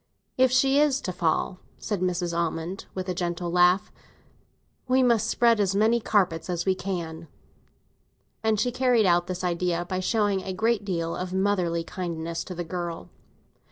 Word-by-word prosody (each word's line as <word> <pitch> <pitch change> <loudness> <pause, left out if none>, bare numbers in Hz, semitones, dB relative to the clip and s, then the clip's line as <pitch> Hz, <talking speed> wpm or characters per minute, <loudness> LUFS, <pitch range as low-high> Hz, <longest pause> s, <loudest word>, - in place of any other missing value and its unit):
"If 260 -1 +4
she 270 +2 +4
is 290 -2 +3
to 185 - -3
have - - -12
a - - -24
fall," 175 +2 0 0.2
said 205 -4 -3
Mrs. 175 -2 -1
Almond, 170 +2 -3
with 185 0 -4
a 185 - -1
gentle 175 -1 -3
laugh, 180 +2 +3 1.0
"we 260 +1 +3
must 230 -3 +3
spread 230 -1 +3
as 195 -1 +1
many 220 +3 +3
carpets 185 -7 0
as 175 -1 -2
we 190 - +3
can." 170 -4 -5 1.2
And 220 -1 +2
she 245 +4 +1
carried 250 -3 +3
out 175 -1 +3
this 185 0 -4
idea 175 0 -1
by 185 +1 -3
showing 205 0 +1
a 190 0 -5
great 220 +2 +1
deal 170 -4 -2
of 180 0 -5
motherly 185 -4 +1
kindness 170 -2 -4
to 180 - -7
the 175 - -3
girl. 170 0 -5
185 Hz, 175 wpm, -26 LUFS, 175-215 Hz, 1.2 s, If